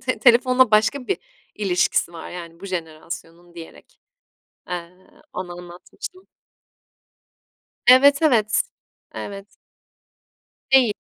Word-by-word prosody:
te 255 Hz, -, 0 dB
telefonla 255 Hz, 0 st, +5 dB
başka 235 Hz, +5 st, +2 dB
bir 390 Hz, -, -1 dB, 0.4 s
ilişkisi 180 Hz, -3 st, +1 dB
var 165 Hz, -, -9 dB
yani 170 Hz, -1 st, -9 dB
bu 195 Hz, -, -8 dB
jenerasyonun 170 Hz, 0 st, -7 dB
diyerek, 165 Hz, -1 st, -13 dB, 0.7 s
eee, 175 Hz, -1 st, -4 dB, 0.4 s
ona 180 Hz, -1 st, -5 dB
anlatmıştım. 180 Hz, -, -10 dB, 1.6 s
Evet, 280 Hz, +4 st, +7 dB
evet. 225 Hz, -9 st, +3 dB, 0.5 s
Evet. 200 Hz, 0 st, -7 dB, 1.2 s
Değil. 250 Hz, -6 st, +5 dB
195 Hz, 90 wpm, -22 LUFS, 175-255 Hz, 1.6 s, Evet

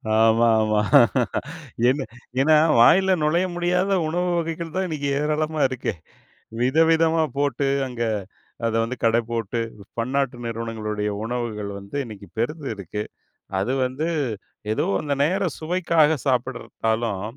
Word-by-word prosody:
ஆமா. 115 Hz, +1 st, +4 dB
ஆமா. 110 Hz, -1 st, +2 dB, 1.1 s
என்ன 135 Hz, +2 st, +1 dB, 0.4 s
ஏன்னா 155 Hz, +2 st, +5 dB, 0.2 s
வாயில 190 Hz, +9 st, +6 dB
நுழைய 170 Hz, +5 st, +2 dB
முடியாத 180 Hz, +3 st, +1 dB, 0.2 s
உணவு 180 Hz, +2 st, 0 dB
வகைகள் 165 Hz, 0 st, -4 dB
தான் 190 Hz, 0 st, 0 dB
இன்னிக்கு 145 Hz, -3 st, -2 dB
ஏராளமா 155 Hz, +1 st, -1 dB
இருக்கே. 130 Hz, -1 st, -3 dB, 0.7 s
வித 130 Hz, +5 st, +1 dB
விதமா 165 Hz, 0 st, +3 dB
போட்டு, 140 Hz, -1 st, 0 dB, 0.2 s
அங்க 120 Hz, -2 st, -4 dB, 0.6 s
அத 115 Hz, -, 0 dB
வந்து 120 Hz, +3 st, -3 dB
கட 115 Hz, 0 st, +4 dB
போட்டு, 115 Hz, 0 st, -2 dB, 0.4 s
பன்னாட்டு 130 Hz, +1 st, 0 dB
நிறுவனங்களுடைய 110 Hz, -2 st, -3 dB
உணவுகள் 115 Hz, -4 st, -3 dB
வந்து 100 Hz, +8 st, -7 dB
இன்னைக்கு 105 Hz, -3 st, -10 dB
பெருத்து 140 Hz, +5 st, -2 dB
இருக்கு. 100 Hz, +2 st, -5 dB, 0.6 s
அது 115 Hz, +7 st, -1 dB
வந்து 135 Hz, +6 st, -2 dB, 0.7 s
ஏதோ -, -, 0 dB, 0.2 s
அந்த 145 Hz, -2 st, -1 dB
நேர 185 Hz, +4 st, +1 dB
சுவைக்காக 160 Hz, -2 st, +2 dB
சாப்பிடறதாலும், 115 Hz, -5 st, -1 dB
130 Hz, 120 wpm, -23 LUFS, 115-160 Hz, 1.1 s, வாயில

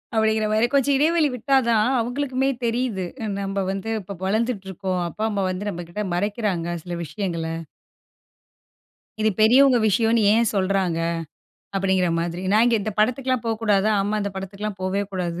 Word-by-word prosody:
அப்டிங்கிறமாரி 220 Hz, 0 st, +2 dB
கொஞ்சம் 280 Hz, 0 st, +3 dB
இடைவெளி 315 Hz, +1 st, +3 dB
விட்டா 265 Hz, +3 st, +2 dB
தான் 220 Hz, 0 st, +3 dB
அவுங்களுக்குமே 260 Hz, +2 st, -1 dB, 0.2 s
தெரியிது. 230 Hz, -5 st, -1 dB, 0.4 s
நம்ம 195 Hz, 0 st, -2 dB
வந்து 195 Hz, +3 st, -4 dB
இப்ப 195 Hz, -1 st, -8 dB
வளர்ந்துட்டுருக்கோம். 195 Hz, -4 st, -1 dB
அப்பா, 215 Hz, +6 st, -3 dB
அம்மா 200 Hz, -2 st, -1 dB
வந்து 190 Hz, +3 st, -4 dB
நம்மகிட்ட 175 Hz, +3 st, -5 dB
மறைக்கிறாங்க 190 Hz, -3 st, -1 dB
சில 175 Hz, -1 st, -5 dB
விஷயங்கள. 170 Hz, -4 st, -3 dB, 1.8 s
"இது 220 Hz, -, +3 dB
பெரியவங்க 255 Hz, +3 st, +6 dB
விஷயம்னு 225 Hz, +2 st, +2 dB
ஏன் 230 Hz, 0 st, +3 dB
சொல்றாங்க?" 190 Hz, -3 st, +1 dB, 0.8 s
அப்டிங்கிற 190 Hz, -2 st, +2 dB
மாதிரி. 175 Hz, +2 st, -3 dB
நான் 215 Hz, +2 st, +5 dB
இங்கே 235 Hz, -, +3 dB
இந்த 215 Hz, +1 st, -3 dB
படத்துக்ல்லாம் 255 Hz, +2 st, +1 dB
போ 230 Hz, -, 0 dB
கூடாதா? 210 Hz, -1 st, +3 dB
ஆமா 205 Hz, +2 st, -1 dB
இந்த 200 Hz, -, -2 dB
படத்துக்ல்லாம் 195 Hz, +1 st, -5 dB
போவே 190 Hz, +2 st, 0 dB
கூடாது 175 Hz, -2 st, -3 dB
210 Hz, 140 wpm, -23 LUFS, 190-230 Hz, 1.8 s, பெரியவங்க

